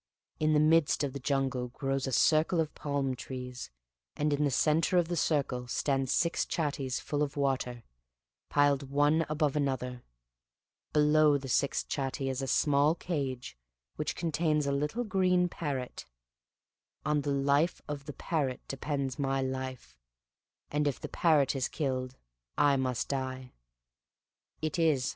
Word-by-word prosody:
In 155 0 +2
the 150 - +4
midst 155 -1 +4
of 140 -2 -2
the 140 - -5
jungle 135 -2 -1
grows 135 +1 -2
a - - -2
circle 155 +6 +3
of 155 -2 0
palm 140 -3 -2
trees, 125 -1 -7 0.5
and 150 0 +1
in 145 +1 +1
the - - +2
center 155 +7 +2
of 175 -1 +2
the 175 - -1
circle 140 -6 0
stand 135 +1 0
six 170 +5 +2
chattees 145 -5 -2
full 145 0 -2
of 145 -1 -1
water, 130 -4 -1 0.7
piled 140 -1 +2
one 145 +3 +3
above 150 -2 0
another: 130 -4 -1 0.9
below 150 0 +4
the 135 -1 -7
sixth 135 +2 +1
chattee 135 -1 -2
is 130 0 -2
a 135 - -3
small 145 +3 +3
cage 140 - -4 0.4
which - - -2
contains 155 -2 0
a 140 - 0
little 150 +12 -1
green 185 -4 +2
parrot; 140 -7 -4 1.0
on 150 0 +2
the 145 - -3
life 140 +4 +2
of 145 -2 -5
the 145 - -5
parrot 140 -6 -2
depends 135 -1 -3
my 135 -1 0
life; 130 - -4 0.7
and 150 0 +1
if 140 - -1
the - - -6
parrot 150 -5 +3
is 130 -2 0
killed 130 -3 -2 0.4
I 145 -1 +4
must 130 -3 -1
die. 130 -2 -4 1.1
It 155 +3 -1
is. 150 -6 +3
140 Hz, 150 wpm, -30 LUFS, 130-150 Hz, 1.1 s, the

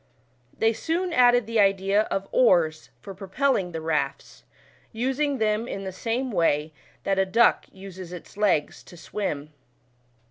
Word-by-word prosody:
They 225 +1 +2
soon 340 +8 -2
added 245 -4 +5
the 230 0 -1
idea 195 +1 +3
of 195 0 -2
oars 170 -10 +3
for 195 - -9
pro 190 +1 -10
pelling 200 -4 0
the 165 -1 -5
rafts, 155 -4 -3 0.5
using 265 +5 -1
them 220 0 0
in 195 - -5
the 190 - -5
same 240 +6 -3
way, 155 -4 +1 0.3
that 195 -1 0
a 195 - +3
duck 230 +5 +3
uses 190 -2 -10
its 180 +2 -10
legs 195 -8 0
to 175 - -15
swim. 155 -6 -4
195 Hz, 150 wpm, -25 LUFS, 180-235 Hz, 0.5 s, added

